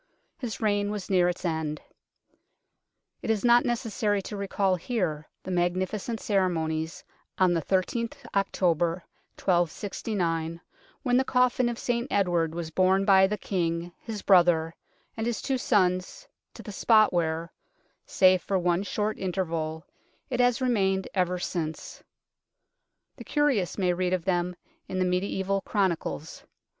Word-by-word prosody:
His 225 -8 -5
reign 205 -1 +1
was 205 -2 -5
near 180 -2 +4
its 180 +1 -5
end. 160 -2 -2 1.4
It - - -5
is 220 0 +1
not 240 0 +6
necessary 220 -3 0
to 210 - -6
recall 195 -1 0
here 175 -6 -2 0.2
the 185 - -5
magnificent 185 +5 -1
ceremonies 165 -5 -1 0.3
on 185 -2 +4
the 165 - +1
i3th 195 +7 -1 0.2
October 175 -3 +1 0.3
1269, 175 -2 -1 0.4
when 245 -2 +3
the 260 - +3
coffin 250 -1 +2
of 235 - -4
St 240 +1 -1
Edward 175 -5 +1
was 170 -2 -4
borne 190 +3 +3
by 190 -1 +6
the 210 +2 -2
King, 170 -3 -2
his 220 -3 -7
brother, 170 -4 +4 0.4
and 225 0 -2
his 235 -2 -1
two 265 -2 -1
sons 195 - +1 0.3
to - - -10
the 210 - -7
spot 215 +1 +4
where, 165 -1 -1 0.5
save 185 -1 +4
for 195 - 0
one 175 0 +1
short 210 +1 -2
interval, 165 -4 -2 0.5
it 250 - -1
has 245 +1 +3
remained 195 -6 +1
ever 180 -1 +1
since; 165 -3 -4 1.2
the - - -9
curious 280 - +1
may 180 -3 +2
read 180 +1 -1
of 180 -3 -1
them 180 -1 0 0.3
in 185 - -4
the 185 - +2
mediaeval 190 +2 0
chronicles. 180 -6 -2
185 Hz, 140 wpm, -27 LUFS, 175-210 Hz, 1.4 s, not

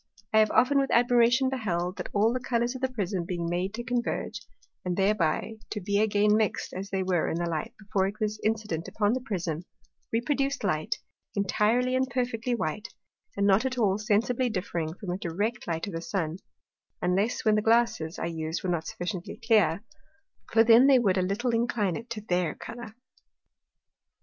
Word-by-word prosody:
I 220 - +6
have 215 -1 +5
often 275 +3 +4
with 270 -1 +1
admiration 245 +2 +4
beheld, 185 -8 -2
that - - -5
all 215 +3 +3
the 255 - -1
Colours 240 -1 0
of 260 - -8
the 260 - +1
Prism 200 -7 -2
being 170 -1 -3
made 175 +3 -1
to 240 - -4
converge, 245 -1 -2 0.4
and 180 -1 -2
thereby 195 +1 +1
to 210 - -3
be 200 +1 0
again 210 0 +3
mixed 215 -2 0
as 195 +2 -5
they 190 -1 -1
were 180 -3 +1
in - - -2
the 175 0 -1
light 160 -2 -3
before 200 -2 0
it 205 +2 -6
was 215 0 -1
incident 210 -7 -1
upon 210 0 +1
the 255 - -1
Prism, 175 - -3 0.5
reproduced 275 +3 0
light, 155 -6 0 0.4
intirely 220 +5 +2
and 260 0 +1
perfectly 245 -1 -1
white, 210 0 -3 0.5
and 200 - +2
not 200 +3 +4
at 260 -1 -2
all 205 -4 +2
sensibly 235 +4 +1
differing 175 -6 -3
from 190 -2 -6
a 180 - -3
direct 205 +7 -2
light 165 -1 -2
of 200 - -7
the 165 - -3
Sun, 170 -2 -2 0.6
unless 195 +8 0
when 215 - +5
the 215 - +3
Glasses, 225 -8 +2
I - - -3
used, 160 0 -3
were 185 - 0
not 165 -2 -2
sufficiently 175 0 -5
clear; 205 -4 +3 0.7
for 225 0 +6
then 230 +3 +7
they 275 -2 +7
would 200 -6 +2
a - - +2
little 205 +7 0
incline 230 -6 0
it 230 +2 -7
to 225 -2 -5
their 180 -5 0
Colour. 230 -2 -9
210 Hz, 190 wpm, -28 LUFS, 180-235 Hz, 0.7 s, then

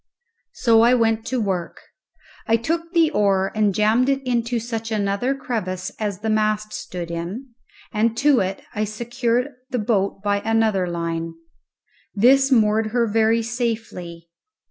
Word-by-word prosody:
So 230 -2 +4
I 240 +2 +5
went 225 -2 +1
to 255 0 -1
work. 190 -5 -2 0.7
I 225 - +4
took 330 +8 -3
the 330 -3 +3
oar 195 -2 +1
and 215 -2 +2
jammed 220 +5 +3
it 270 0 0
into 240 -1 0
such 225 -1 -4
another 210 +5 0
crevice 185 -9 -4
as 205 -3 -3
the 220 - -2
mast 215 0 0
stood 175 -2 -6
in, 195 +10 -6 0.4
and 225 +1 +1
to 285 -1 +4
it 190 +1 -2
I 215 - -1
secured 235 +4 -1 0.2
the 250 - -2
boat 205 -3 0
by 205 0 +1
another 220 -4 +1
line. 165 -1 -3 0.8
This 270 +6 +4
moored 220 -2 +3
her 235 +2 +1
very 225 +1 +2
safely. 225 -8 -4
220 Hz, 145 wpm, -22 LUFS, 200-240 Hz, 0.8 s, I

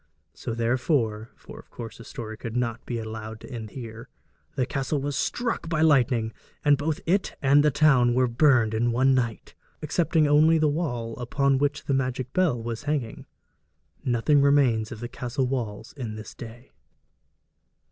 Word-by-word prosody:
So 115 - -5
therefore 115 -2 0
(for - - -12
of - - -16
course 115 -1 -9
the - - -9
story 110 -1 -7
could 115 +1 -7
not 120 -1 -2
be 120 - -2
allowed 110 0 -6
to - - -11
end 110 -3 -6
here) 115 0 -9 0.5
the 130 -3 +1
castle 135 +2 -2
was 140 0 -3
struck 235 - -2
by 160 -2 0
lightning, 125 -7 +3 0.3
and 145 0 +6
both 150 +2 -2
it 190 +3 0
and 140 +1 +4
the 150 - +5
town 130 -5 +4
were 130 0 +4
burned 120 -2 +3
in 120 +2 +1
one 130 +3 +3
night 115 -4 -2 0.3
excepting 160 0 +1
only 155 +3 +5
the 155 -1 +3
wall 120 -7 -2
upon 135 +2 +1
which 145 +1 -1
the 140 - 0
magic 130 -1 -2
bell 175 -10 +2
was 115 0 -5
hanging. 135 -7 -3 0.8
Nothing 130 +4 +3
remains 135 -6 +3
of 110 -2 -8
the 120 - -4
castle 125 +2 -3
walls 115 -4 -4
in 120 -6 -6
this 110 0 -9
day. 120 +2 -11
125 Hz, 170 wpm, -26 LUFS, 115-145 Hz, 0.8 s, and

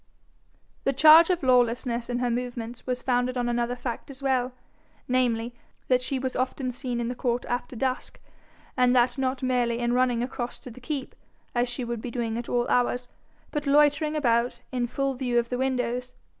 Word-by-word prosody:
The 275 - +1
charge 315 +5 +8
of 355 -4 0
lawlessness 245 -1 +2
in 245 - -1
her 245 -1 0
movements 240 0 -4
was 250 -1 -2
founded 250 0 +1
on 245 -1 0
another 240 0 0
fact 245 +1 -5
as 275 0 -10
well, 260 -2 +1 0.6
namely, 240 -2 +1 0.4
that 255 -1 +4
she 265 +1 -2
was 260 0 -3
often 255 0 -1
seen 245 -1 -4
in 235 - -1
the 245 - -2
court 245 -1 -1
after 245 +1 -3
dusk, 255 +1 -2 0.6
and 250 0 +3
that 245 +2 +3
not 260 0 -1
merely 245 -2 +1
in 240 0 0
running 245 -1 +2
across 245 -1 -4
to 250 - -9
the 255 - -13
keep, 270 +1 -4 0.4
as 240 0 +1
she 245 +1 -4
would 235 -2 -4
be 245 - -5
doing 235 -2 -2
at 240 - -7
all 240 0 +1
hours, 245 0 +1 0.4
but 295 -2 -3
loitering 295 +2 +4
about, 240 -4 +1
in 245 -2 -1
full 275 +2 -1
view 250 -2 -1
of 235 0 +1
the 250 - -2
windows. 250 -1 -1
250 Hz, 190 wpm, -26 LUFS, 240-260 Hz, 0.6 s, charge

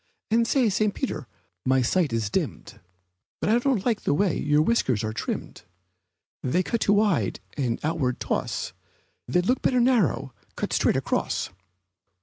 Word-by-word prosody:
And 230 +1 +3
say, 260 -3 +3
St. 210 0 +1
Peter, 155 - -3 0.4
my 130 0 +3
sight 165 +4 +1
is 110 -2 -1
dimmed, - - -3 0.6
But - - +1
I 235 - +5
don't 245 -6 0
like 230 -4 +1
the - - +1
way 190 0 +2
your 150 +1 +2
whiskers 135 - +1
are 110 0 -2
trimmed, - - -4 0.8
They're 170 +8 +1
cut 230 +5 -2
too 205 - +4
wide 205 -3 +2 0.2
and 125 -5 -1
outward 145 -5 0
toss: - - -2 0.5
They'd 180 +9 +1
look 250 +5 +1
better 250 - +2
narrower, 225 - +2 0.2
cut - - -3
straight - - +3
across. - - -1
180 Hz, 155 wpm, -25 LUFS, -, 0.8 s, I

